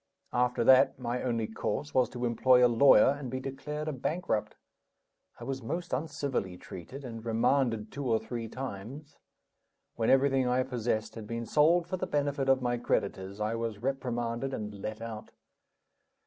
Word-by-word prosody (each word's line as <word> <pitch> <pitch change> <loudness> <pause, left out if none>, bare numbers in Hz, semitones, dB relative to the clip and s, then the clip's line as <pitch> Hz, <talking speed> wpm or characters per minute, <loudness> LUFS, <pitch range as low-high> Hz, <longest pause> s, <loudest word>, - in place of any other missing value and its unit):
After 125 -1 +2
that, 130 +2 +6
my 125 0 -3
only 115 -3 -1
course 135 +6 -3
was 130 -1 +3
to 125 -1 -4
employ 125 +1 +5
a - - +7
lawyer 120 0 +6
and 135 -3 -5
be 130 +2 -3
declared 140 +3 -5
a 155 - -1
bankrupt. 135 - -2 0.8
I - - -8
was 135 -1 -4
most 170 +9 -4
uncivilly 140 - -2
treated, 130 - -9
and 115 -2 -7
remanded 115 -1 +1
two 140 -1 -4
or 110 - +4
three 115 +1 -5
times. 130 +4 -7 0.8
When 115 - +1
everything 135 -1 +4
I 125 +1 +2
possessed 120 -4 -2
had 110 -2 -8
been 115 +1 -4
sold 165 +6 +4
for 185 - -2
the 185 - -3
benefit 145 -2 0
of 130 -1 +3
my 120 0 +1
creditors, 100 -4 -2
I 105 +1 -1
was 115 -2 -3
reprimanded 125 -1 -2
and 105 -1 -5
let 110 +2 -6
out. 110 -1 -7
125 Hz, 165 wpm, -30 LUFS, 115-135 Hz, 0.8 s, a